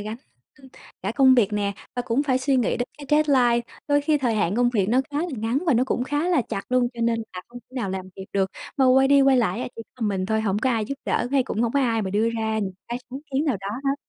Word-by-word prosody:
gánh 215 +2 -5 0.9
cả 200 +3 -2
công 265 -2 +6
việc 215 -4 +3
nè, 205 -1 0 0.2
và 245 - 0
cũng 240 +4 0
phải 260 -3 +1
suy 270 0 +1
nghĩ 245 - +1
đến 245 - -3
cái 285 - -9
deadline, 265 -6 +4 0.3
đôi 290 0 +4
khi 295 0 +1
thời 240 -4 0
hạn 200 0 0
công 245 0 +3
việc 205 -6 +1
nó 250 +3 +3
khá 290 - -2
là 350 +3 -1
ngắn 225 +4 0
và 310 - +4
nó 250 +3 +3
cũng 250 -1 -1
khá 290 +6 -1
là 325 -9 +3
chặt 195 - -3
luôn, 250 -1 +3
cho 235 - -7
nên 230 0 +1
là 180 - -6
không 245 - -10
thể 250 +3 -23
nào 210 -6 -2
làm 190 0 -5
kịp 190 +1 -9
được. 190 -1 +1 0.3
Mà 265 - +4
quay 265 +1 +5
đi 280 0 +6
quay 270 -1 +5
lại 225 -2 +1
á - - -4
chỉ 230 - -6
có 230 -4 -2
mình 190 -2 -1
thôi, 220 0 +1
hổng 205 -2 0
có 260 +4 +1
ai 225 -2 0
giúp 275 - -4
đỡ, 240 - 0
hay 270 -2 +4
cũng 225 -1 -2
hổng 235 - 0
có 280 - +2
ai 230 -4 +1
mà 190 - -3
đưa 215 +3 +2
ra 220 -1 -1
những 195 -3 -2 0.2
cái 240 +1 -3
sáng 265 - -5
kiến 275 +3 0
nào 275 -9 +1
đó 195 - -5 0.2
hết. 275 - +2
240 Hz, 295 wpm, -24 LUFS, 215-265 Hz, 0.9 s, công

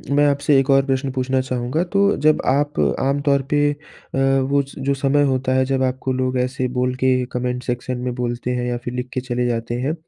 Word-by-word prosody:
मैं 145 0 +4
आपसे 140 0 +2
एक 135 +1 -1
और 135 0 +4
प्रश्न 135 0 -1
पूछना 130 0 0
चाहूँगा। 130 +5 -1
तो 200 +3 +2
जब 155 - +4
आप 145 +2 +1 0.2
आम 140 +2 +1
तौर 140 -1 +2
पे 145 0 +3
अ, 145 -2 -10
वो 135 +1 +2
स 140 0 -11
जो 140 +1 0
समय 140 +1 +2
होता 130 -1 0
है 130 0 +3
जब 135 0 0
आपको 130 0 -1
लोग 130 0 -1
ऐसे 130 0 -1
बोल 125 0 +1
के 130 - +4 0.2
कमेंट 125 0 -2
सेक्शन 125 +1 -3
में 125 0 -3
बोलते 120 0 -2
हैं 125 0 -2
या 120 - -1
फिर 120 0 -6
लिख 125 0 -4
के 130 - -2
चले 125 -1 -2
जाते 115 0 -2
हैं। 140 +4 0
130 Hz, 225 wpm, -20 LUFS, 125-140 Hz, 0.2 s, मैं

